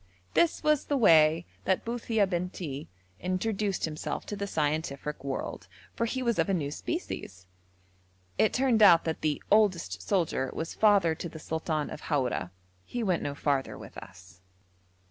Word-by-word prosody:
This 340 -1 +2
was 305 -2 +2
the 285 - 0
way 165 -6 +5 0.2
that 190 - +1
Buthia 230 -2 +1
Bentii 175 -5 -4 0.3
introduced 195 - -1
himself 155 -1 -4
to 205 - -5
the 200 0 -3
scientific 150 -3 -2
world, 135 -1 -4 0.3
for 230 - 0
he 260 +2 -2
was 235 -2 +1
of - - +2
a 195 - +2
new 145 -4 -2
species. 95 - -5 0.9
It 220 - +4
turned 250 -4 +2
out 175 -5 +8
that 160 -1 -3
the 150 -2 -1
'oldest 185 - +3
soldier' 135 - 0
was 160 - -4
father 200 -6 +4
to 170 +2 -6
the 160 - -10
sultan 160 -1 -2
of - - -7
Haura. 130 - -1 0.3
He 240 - -4
went 185 -5 +1
no 140 - -3
farther 140 -2 -1
with - - -11
us. 90 -1 -13
170 Hz, 160 wpm, -29 LUFS, 150-210 Hz, 0.9 s, out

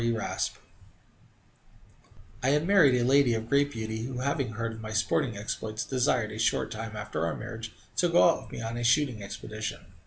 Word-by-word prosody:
E. 115 - +2
Raspe 115 -2 -2 1.8
I 130 - +2
had 150 +3 +2
married 165 -10 +5
a 120 - +1
lady 135 -2 +4
of 110 0 -3
great 140 +3 +3
beauty, 110 -2 -4
who, 125 +1 -4
having 135 -3 -1
heard 115 +1 -3
of 110 - -9
my 110 0 -6
sporting 110 +1 0
exploits, 110 +1 -4
desired, 125 -4 +1
a 110 - -7
short 110 - +1
time 110 0 -5
after 105 -6 -3
our 85 - -1
marriage, - - -7 0.3
to - - +3
go - - +6
out - - +2
with - - -14
me - - -6
on 115 +1 -4
a 120 - -3
shooting 125 -2 +2
expedition. 110 0 -6
115 Hz, 195 wpm, -28 LUFS, 110-130 Hz, 1.8 s, go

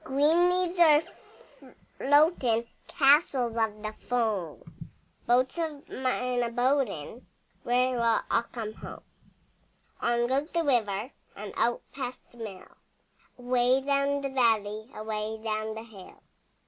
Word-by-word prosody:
Green 320 +5 +3
leaves 360 0 0
a 310 -3 +7 1.0
floating, 275 -6 +3 0.2
Castles 270 -5 +3
of 220 -2 -1
the 215 0 -4
foam, 215 -10 -2 0.6
Boats 255 +6 +2
of 310 -4 -4
mine 250 -1 -1
a 235 - 0
boating— 245 - -1 0.3
Where 250 +1 +1
will 230 -1 +2
all - - +3
come 220 -3 -5
home? - - -10 1.0
On 240 0 +1
goes 275 +5 0
the 335 -1 0
river 230 -4 0 0.2
And 205 +1 -8
out 240 0 0
past 255 -2 -5
the 240 - -19
mill, 200 -5 -8 0.7
Away 250 +1 +2
down 280 +1 +1
the 275 - -3
valley, 220 -4 +1
Away 215 0 -4
down 215 0 -2
the 220 - -7
hill. 210 -5 -14
245 Hz, 125 wpm, -28 LUFS, 220-275 Hz, 1.0 s, a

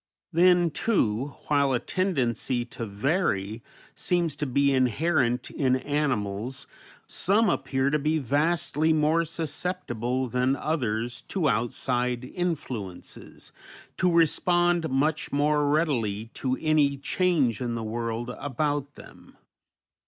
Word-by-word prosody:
Then, 175 0 +4
too, 140 - 0
while 140 -2 +2
a 125 - +2
tendency 130 - -1
to 115 -1 -7
vary 110 - -1 0.3
seems 170 -5 0
to 150 - -2
be 140 +2 +2
inherent 130 0 +1
in 130 -3 +1
animals, 130 -3 -2 0.4
some 205 +2 +2
appear 135 -1 0
to 150 - +2
be 155 +2 +1
vastly 155 +3 +1
more 155 +2 +2
susceptible 140 -6 -2
than 125 +2 +1
others 120 -7 -2
to 180 -6 0
outside 125 0 -1
influences, 130 - -5 0.5
to 180 -1 +2
respond 175 +1 +3
much 150 +4 0
more 145 0 +2
readily 115 -9 0
to 130 -1 -2
any 150 -3 +2
change 140 - +1
in 120 -2 -2
the 115 - -3
world 115 +2 -3
about 145 +1 -2
them. - - -15
140 Hz, 115 wpm, -26 LUFS, 120-160 Hz, 0.5 s, Then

